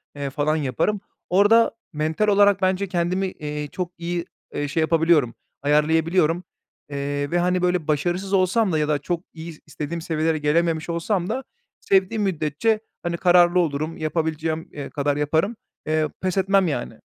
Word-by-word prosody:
eee, 140 Hz, -1 st, -3 dB
falan 150 Hz, +2 st, 0 dB
yaparım. 160 Hz, +8 st, -1 dB, 0.3 s
Orada 205 Hz, +5 st, +5 dB, 0.2 s
mental 155 Hz, +7 st, 0 dB
olarak 200 Hz, -1 st, +4 dB
bence 190 Hz, +1 st, +1 dB
kendimi, 180 Hz, +1 st, 0 dB
eee, 150 Hz, -4 st, -5 dB
çok 175 Hz, +4 st, -5 dB
iyi, 170 Hz, 0 st, -3 dB, 0.3 s
eee, 145 Hz, -, -2 dB
şey 155 Hz, +3 st, -1 dB
yapabiliyorum, 160 Hz, -6 st, +3 dB, 0.3 s
ayarlayabiliyorum. 160 Hz, +3 st, +2 dB, 0.5 s
Eee, 145 Hz, 0 st, -3 dB
ve, 175 Hz, -, +2 dB
hani, 180 Hz, +1 st, +1 dB
böyle 180 Hz, -3 st, 0 dB
başarısız 175 Hz, +6 st, -1 dB
olsam 195 Hz, +2 st, +3 dB
da 160 Hz, -, +1 dB
ya 150 Hz, -, +1 dB
da 150 Hz, -2 st, +1 dB
çok 170 Hz, +3 st, -3 dB
iyi, 160 Hz, -1 st, -9 dB
istediğim 150 Hz, +3 st, -5 dB
seviyelere 160 Hz, -1 st, 0 dB
gelememiş 160 Hz, +2 st, +1 dB
olsam 175 Hz, +2 st, -1 dB
da 265 Hz, -, -2 dB, 0.4 s
sevdiğim 195 Hz, +3 st, +2 dB
müddetçe, 185 Hz, +5 st, 0 dB, 0.2 s
hani, 170 Hz, 0 st, -2 dB
kararlı 175 Hz, 0 st, +5 dB
olurum, 155 Hz, -1 st, -1 dB
yapabileceğim, 160 Hz, 0 st, -2 dB
eee, 145 Hz, -, -7 dB
kadar 145 Hz, 0 st, -1 dB
yaparım. 160 Hz, +9 st, +1 dB, 0.3 s
Eee, 155 Hz, 0 st, +1 dB
pes 185 Hz, 0 st, -1 dB
etmem 195 Hz, 0 st, +3 dB
yani. 65 Hz, -, -4 dB
165 Hz, 155 wpm, -23 LUFS, 150-185 Hz, 0.5 s, Orada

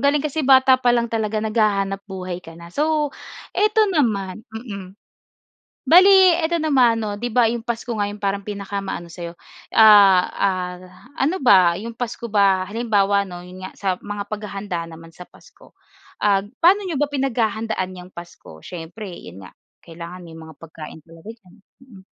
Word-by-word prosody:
galing 285 Hz, +1 st, +2 dB
kasi 305 Hz, +1 st, -2 dB
bata 260 Hz, -1 st, +5 dB
pa 245 Hz, -, +3 dB
lang 235 Hz, -1 st, -2 dB
talaga 220 Hz, -1 st, -1 dB
naghahanap-buhay 195 Hz, -4 st, -2 dB
ka 165 Hz, -2 st, -13 dB
na. 170 Hz, 0 st, -13 dB
So, 300 Hz, -, 0 dB, 0.4 s
eto 430 Hz, +1 st, +3 dB
naman 215 Hz, -, -1 dB
mm. 200 Hz, -4 st, -9 dB, 0.9 s
Bale 370 Hz, 0 st, +6 dB
eto 340 Hz, 0 st, -1 dB
naman 255 Hz, -7 st, +3 dB
'no, 205 Hz, -1 st, -4 dB
'di 240 Hz, +1 st, -5 dB
ba 235 Hz, -2 st, +4 dB
'yong 230 Hz, 0 st, -4 dB
Pasko 235 Hz, 0 st, -4 dB
nga 205 Hz, -, 0 dB
'yong 205 Hz, 0 st, -7 dB
parang 200 Hz, 0 st, -2 dB
pinaka-maano 200 Hz, -3 st, -5 dB
sa'yo, 170 Hz, 0 st, -8 dB, 0.4 s
ah, 205 Hz, -4 st, +7 dB
ah, 180 Hz, -2 st, -2 dB, 0.4 s
ano 315 Hz, +8 st, 0 dB
ba? 185 Hz, -8 st, +5 dB
'Yong 225 Hz, +6 st, -7 dB
Pasko 235 Hz, -1 st, -5 dB
ba 200 Hz, -3 st, +3 dB
Halimbawa 205 Hz, -3 st, +1 dB
'no, 175 Hz, -2 st, -9 dB
'yon 180 Hz, +1 st, -10 dB
nga, -, -, -10 dB
sa 200 Hz, -, -7 dB
mga 205 Hz, +1 st, -7 dB
paghahanda 200 Hz, -4 st, -5 dB
naman 165 Hz, 0 st, -12 dB
sa 180 Hz, +2 st, -13 dB
Pasko, -, -, -21 dB, 0.5 s
ah, 200 Hz, -1 st, +2 dB, 0.2 s
paano 385 Hz, +4 st, +4 dB
n'yo 320 Hz, -6 st, -3 dB
ba 295 Hz, -, +1 dB
pinaghahandaan 220 Hz, -8 st, -2 dB
'yang 180 Hz, 0 st, -11 dB
Pasko? 170 Hz, -, -12 dB
Siyempre 180 Hz, -, -9 dB
'yon 95 Hz, -, -11 dB
nga, 90 Hz, -, -11 dB, 0.3 s
kailangan 170 Hz, +2 st, -10 dB
may 165 Hz, -2 st, -12 dB
mga 160 Hz, -1 st, -12 dB
pagkain 160 Hz, -1 st, -11 dB
talaga 165 Hz, +7 st, -12 dB
diyan. 190 Hz, -6 st, -22 dB, 0.3 s
Mm. 235 Hz, -8 st, -16 dB
205 Hz, 165 wpm, -21 LUFS, 180-240 Hz, 0.9 s, ah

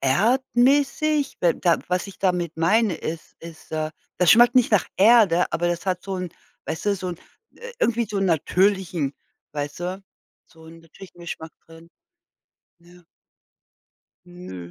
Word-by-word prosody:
erdmäßig, 265 Hz, -, +2 dB
weil 170 Hz, -2 st, +3 dB
da 170 Hz, -2 st, +2 dB
was 180 Hz, +2 st, -1 dB
ich 195 Hz, -, -12 dB
damit 180 Hz, -4 st, -1 dB
meine, 210 Hz, +4 st, +2 dB
ist 160 Hz, 0 st, -7 dB
ist, 165 Hz, -1 st, -12 dB
äh, 155 Hz, 0 st, -2 dB, 0.3 s
das 180 Hz, -2 st, +4 dB
schmeckt 240 Hz, +2 st, +6 dB
nicht 250 Hz, -, +4 dB
nach 205 Hz, -4 st, +3 dB
Erde, 200 Hz, -4 st, +5 dB
aber 175 Hz, +1 st, 0 dB
das 170 Hz, +1 st, -3 dB
hat 180 Hz, -1 st, -1 dB
so 195 Hz, -1 st, -4 dB
'n 180 Hz, -1 st, -5 dB, 0.4 s
weißt 160 Hz, -, -5 dB
du, 205 Hz, -, +3 dB
so 185 Hz, -1 st, -5 dB
'n, 175 Hz, -, -5 dB, 0.4 s
äh, 480 Hz, +1 st, -10 dB
irgendwie 235 Hz, -, +1 dB
so 205 Hz, -, -2 dB
'n 195 Hz, -, +1 dB
natürlichen 180 Hz, -3 st, +1 dB, 0.4 s
weißt 145 Hz, +1 st, -5 dB
du, 185 Hz, +2 st, -4 dB, 0.4 s
so 160 Hz, -1 st, -19 dB
'n 165 Hz, +1 st, -13 dB
natürlichen 175 Hz, +2 st, -15 dB
Geschmack 160 Hz, -1 st, -7 dB
drin. 165 Hz, 0 st, -16 dB, 0.9 s
Ja. 175 Hz, 0 st, -20 dB, 1.2 s
Nö. 95 Hz, -, -10 dB
180 Hz, 155 wpm, -23 LUFS, 165-210 Hz, 1.2 s, schmeckt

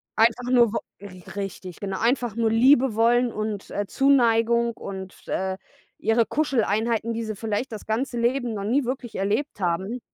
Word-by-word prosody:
einfach 235 Hz, +2 st, +2 dB
nur 240 Hz, -4 st, +5 dB
wo -, -, 0 dB, 0.2 s
r 185 Hz, -2 st, -11 dB
richtig, 195 Hz, -2 st, -6 dB
genau. 195 Hz, -2 st, -4 dB
Einfach 240 Hz, -2 st, +1 dB
nur 230 Hz, -1 st, +1 dB
Liebe 250 Hz, +1 st, +4 dB
wollen 240 Hz, +2 st, +3 dB
und, 215 Hz, -2 st, -4 dB
äh, 205 Hz, 0 st, -2 dB
Zuneigung 235 Hz, -3 st, +3 dB
und, 190 Hz, -3 st, -9 dB
äh, 190 Hz, 0 st, -2 dB, 0.4 s
ihre 225 Hz, +2 st, +2 dB
Kuscheleinheiten, 230 Hz, -5 st, 0 dB
die 230 Hz, 0 st, -3 dB
sie 215 Hz, -1 st, -4 dB
vielleicht 225 Hz, +4 st, -3 dB
das 215 Hz, -, -7 dB
ganze 240 Hz, +2 st, -2 dB
Leben 240 Hz, 0 st, 0 dB
noch 200 Hz, -1 st, -4 dB
nie 260 Hz, +7 st, +2 dB
wirklich 250 Hz, -2 st, -4 dB
erlebt 210 Hz, +8 st, -1 dB
haben. 190 Hz, +7 st, -1 dB
225 Hz, 165 wpm, -24 LUFS, 205-240 Hz, 0.4 s, nur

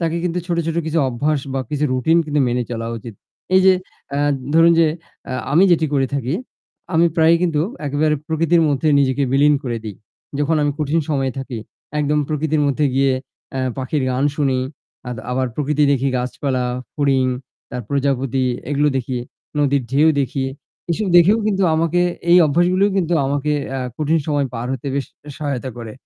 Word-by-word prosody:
তাকে 165 Hz, 0 st, 0 dB
কিন্তু 180 Hz, 0 st, -1 dB
ছোট, 170 Hz, -2 st, -1 dB
ছোট 165 Hz, -, -2 dB
কিছু 160 Hz, +1 st, 0 dB
অভ্যাস 140 Hz, +4 st, 0 dB
বা 135 Hz, -, 0 dB
কিছু 150 Hz, 0 st, 0 dB
রুটিন 130 Hz, +6 st, +2 dB
কিন্তু 150 Hz, -1 st, 0 dB
মেনে 125 Hz, +1 st, 0 dB
চলা 115 Hz, -1 st, -3 dB
উচিত। 115 Hz, -1 st, -9 dB, 0.4 s
এই 190 Hz, -, +7 dB
যে 190 Hz, -, +8 dB, 0.4 s
আ -, -, 0 dB, 0.4 s
ধরুন 165 Hz, +1 st, +6 dB
যে 165 Hz, -, +5 dB, 0.4 s
আ -, -, -3 dB, 0.2 s
আমি 175 Hz, +5 st, +6 dB
যেটি 160 Hz, -2 st, +3 dB
করে 135 Hz, -1 st, +2 dB
থাকি, 135 Hz, +2 st, -1 dB, 0.6 s
আমি 165 Hz, +1 st, +5 dB
প্রায়ই 165 Hz, +1 st, +5 dB
কিন্তু 165 Hz, -4 st, +1 dB, 0.3 s
একেবারে 150 Hz, +2 st, +1 dB
প্রকৃতির 165 Hz, +1 st, +2 dB
মধ্যে 145 Hz, +2 st, +1 dB
নিজেকে 135 Hz, 0 st, +2 dB
বিলীন 145 Hz, +2 st, +5 dB
করে 120 Hz, -4 st, -3 dB
দিই। 105 Hz, -3 st, -6 dB, 0.4 s
যখন 145 Hz, +2 st, +1 dB
আমি 145 Hz, -, +2 dB
কঠিন 155 Hz, +2 st, +1 dB
সময়ে 135 Hz, -4 st, 0 dB
থাকি 130 Hz, -3 st, -5 dB, 0.4 s
একদম 150 Hz, 0 st, +1 dB
প্রকৃতির 155 Hz, 0 st, 0 dB
মধ্যে 145 Hz, +2 st, +1 dB
গিয়ে 135 Hz, 0 st, +3 dB, 0.4 s
অ্যা 135 Hz, -, -2 dB, 0.2 s
পাখির 130 Hz, +2 st, -1 dB
গান 130 Hz, +2 st, 0 dB
শুনি, 135 Hz, -3 st, +1 dB, 0.5 s
আদ 125 Hz, -, -4 dB
আবার 130 Hz, +1 st, 0 dB
প্রকৃতি 150 Hz, +1 st, +1 dB
দেখি, 135 Hz, 0 st, +1 dB
গাছপালা, 125 Hz, +1 st, -2 dB, 0.3 s
ফড়িং, 135 Hz, -3 st, +2 dB, 0.5 s
তার 125 Hz, 0 st, -4 dB
প্রজাপতি 135 Hz, -2 st, 0 dB, 0.3 s
এগুলো 145 Hz, +1 st, +2 dB
দেখি। 130 Hz, -1 st, -2 dB, 0.4 s
নদীর 140 Hz, -2 st, +2 dB
ঢেউ 150 Hz, +4 st, +5 dB
দেখি। 135 Hz, 0 st, -1 dB, 0.5 s
এসব 200 Hz, +5 st, 0 dB
দেখেও 185 Hz, +6 st, +6 dB
কিন্তু 195 Hz, -2 st, +1 dB
আমাকে 165 Hz, +2 st, +1 dB, 0.3 s
এই 175 Hz, -, +8 dB
অভ্যাসগুলোই 180 Hz, +6 st, +2 dB
কিন্তু 175 Hz, -2 st, +1 dB
আমাকে 145 Hz, +2 st, 0 dB, 0.2 s
অ্যা 135 Hz, 0 st, -3 dB, 0.2 s
কঠিন 155 Hz, +2 st, +1 dB
সময় 145 Hz, -3 st, +1 dB
পার 115 Hz, +1 st, -3 dB
হতে 135 Hz, +1 st, -5 dB
বেশ 140 Hz, -1 st, -1 dB, 0.3 s
সহায়তা 140 Hz, -4 st, -3 dB
করে। 115 Hz, -2 st, -7 dB
145 Hz, 175 wpm, -20 LUFS, 130-160 Hz, 0.6 s, যে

